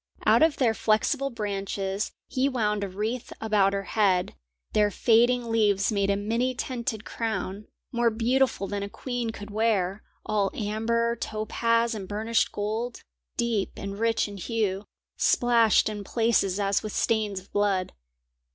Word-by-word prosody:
Out - - +5
of 320 -1 +4
their 240 -4 +3
flexible 260 +6 +1
branches 200 -3 -3 0.2
he 265 +1 +1
wound 210 -5 0
a 200 - -3
wreath 215 +6 -3
about 210 -3 +3
her 200 0 -1
head; 195 -4 +1 0.4
their 210 -1 +4
fading 235 +2 +3
leaves 205 -2 +2
made 200 -2 +1
a 200 - +3
many 230 +5 0
tinted 235 -3 -3
crown, 215 -3 -3 0.2
more 235 -1 +2
beautiful 235 0 +1
than 200 0 -3
a 200 - -4
queen 245 +1 -3
could 205 -2 -8
wear, 205 -3 +1 0.2
all 210 -3 +1
amber, 230 +2 0
topaz, 230 +1 0
and 200 -4 -6
burnished 220 +3 0
gold, 220 +4 -3 0.3
deep 230 -5 0
and 200 +1 -6
rich 230 -1 +1
in 205 -1 -8
hue, 205 -1 -1 0.3
splashed 235 -3 +4
in 210 -1 -4
places 210 -3 +1
as 200 -1 +1
with 215 - -6
stains 215 -3 0
of 190 - -20
blood. 200 -3 +1
215 Hz, 150 wpm, -26 LUFS, 200-235 Hz, 0.4 s, Out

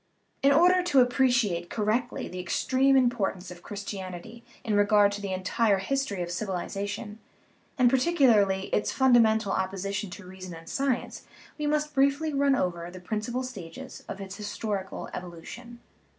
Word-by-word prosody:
In 275 - +5
order 355 +5 +5
to 345 -7 +3
appreciate 245 -8 +2
correctly 225 +3 -1
the 180 - -7
extreme 265 +8 +2
impor 240 -6 +2
tance 180 -1 -11
of 175 -1 -11
Christianity 200 +2 -7 0.2
in 220 - -1
regard 205 0 +4
to 205 0 -5
the 200 -2 -4
entire 195 +3 +1
history 200 -2 -2
of 175 - -5
civilization, 205 +3 -4 0.6
and 250 -2 +5
particularly 240 - +3
its 210 - +1
fundamental 230 -5 +4
oppo 190 +1 -1
sition 195 +1 -3
to 205 - -10
reason 185 -1 -9
and 165 0 -12
science, 270 -3 -2 0.3
we 300 - -1
must 300 0 0
briefly 280 +3 +2
run 280 -1 +3
over 175 -6 -2
the 185 +1 -10
principal 220 +7 -3
stages 195 -11 -9
of 195 - -6
its 195 0 -7
historical 205 -2 -4
evolution. 185 +8 -9
210 Hz, 150 wpm, -27 LUFS, 190-255 Hz, 0.6 s, In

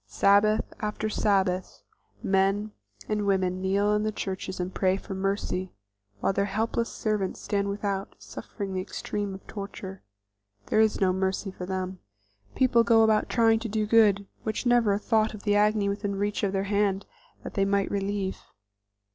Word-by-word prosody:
Sabbath 200 - +3
after 215 0 -2
Sabbath 190 -3 0 0.4
men 195 +2 +1 0.4
and 210 -1 -1
women 185 -1 +1
kneel 200 +2 +2
in 210 - +2
the 215 0 0
churches 190 -2 -4
and 180 +1 -3
pray 190 0 +2
for 195 - -7
mercy, 190 -1 -2 0.5
while - - +2
their 200 +1 +1
helpless 225 +3 -1
servants 210 -3 -2
stand 200 -1 -1
without, 200 -1 -3
suffering 200 -3 -7
the 185 - -1
extreme 205 +1 -4
of 190 - -12
torture. 195 -2 -7 0.6
There 215 - +1
is 220 -1 +3
no 185 -2 +3
mercy 190 +1 -1
for 180 -1 -7
them. 185 -1 -3 0.6
People 240 -3 +4
go 230 -1 +5
about 220 -1 +3
trying 225 -2 +4
to 225 0 -5
do 215 0 0
good, 210 -2 +4 0.2
with 220 +3 -3
never 240 -3 +4
a - - +1
thought 220 0 +1
of 205 - -11
the 205 -1 +2
agony 210 0 +3
within 200 0 -2
reach 205 +1 -1
of 200 - +1
their 195 0 0
hand 200 -1 0 0.4
that - - -7
they 195 - +1
might 200 0 +1
relieve. 200 -1 -2
200 Hz, 170 wpm, -27 LUFS, 190-215 Hz, 0.6 s, go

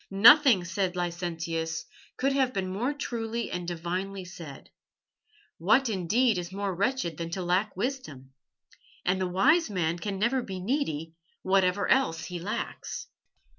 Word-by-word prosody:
"Nothing," 230 - +7
said 185 +1 -1
Licentius, 170 +1 -3 0.3
"could 270 +1 +1
have 265 -2 +2
been 185 -1 -2
more 240 +8 0
truly 235 -5 -3
and 180 -1 -4
divinely 180 +3 -3
said. 165 -6 -10 0.9
What, 230 +9 +3
indeed, 210 +3 +2
is 175 +1 -6
more 200 0 -2
wretched 200 - -1
than 165 -1 -4
to 180 +2 -3
lack 180 +3 0
wisdom? 170 - -4 0.7
And 185 +1 +1
the 185 - +1
wise 275 - +3
man 175 -4 -1
can 200 +1 -3
never 240 +6 +1
be 190 -5 -6
needy, 170 - -2 0.3
whatever 190 +1 +2
else 165 -12 +2
he 180 -1 -5
lacks." 200 +5 -5
190 Hz, 140 wpm, -28 LUFS, 175-235 Hz, 0.9 s, Nothing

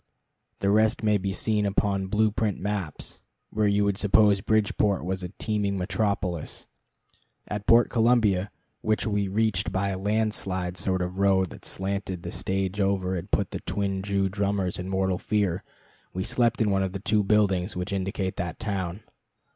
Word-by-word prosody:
The 100 - +2
rest 110 +2 +3
may 105 -1 +3
be 95 +1 -2
seen 105 +2 0
upon 100 -1 0
blue 105 +2 +2
print 105 -2 -1
maps, 100 -6 -4 0.3
where 105 0 +1
you 100 0 +3
would 100 -1 +1
suppose 105 -1 +4
Bridgeport 105 -3 +1
was 95 +1 -2
a 90 - -5
teeming 105 -2 -1
metropolis. 95 -3 -2 0.8
At 105 -1 -5
Port 115 +1 +5
Columbia, 110 -5 +3 0.3
which 110 0 0
we 105 -2 0
reached 100 -1 0
by 100 +1 0
a 95 -1 -3
land 110 +2 +1
slide 90 -3 -3
sort 95 -1 -1
of 90 +1 -5
road 95 -2 +3
that - - -12
slanted 95 -2 -3
the - - -5
stage 95 +1 -1
over 95 -1 +1
and 90 +1 -5
put 100 -2 0
the - - -4
twin 100 -1 -2
Jew 100 0 0
drummers 100 -2 -1
in 90 +1 -4
mortal 95 -1 0
fear, 100 -3 0 0.5
we 95 - -1
slept 120 +2 +1
in 105 -2 +3
one 95 0 +2
of 95 -1 -2
the 95 - -3
two 105 +2 +2
buildings 100 -2 +2
which 90 +3 -3
indicate 95 0 -2
that 85 -1 -3
town. 100 -2 -3
100 Hz, 175 wpm, -26 LUFS, 95-105 Hz, 0.8 s, Port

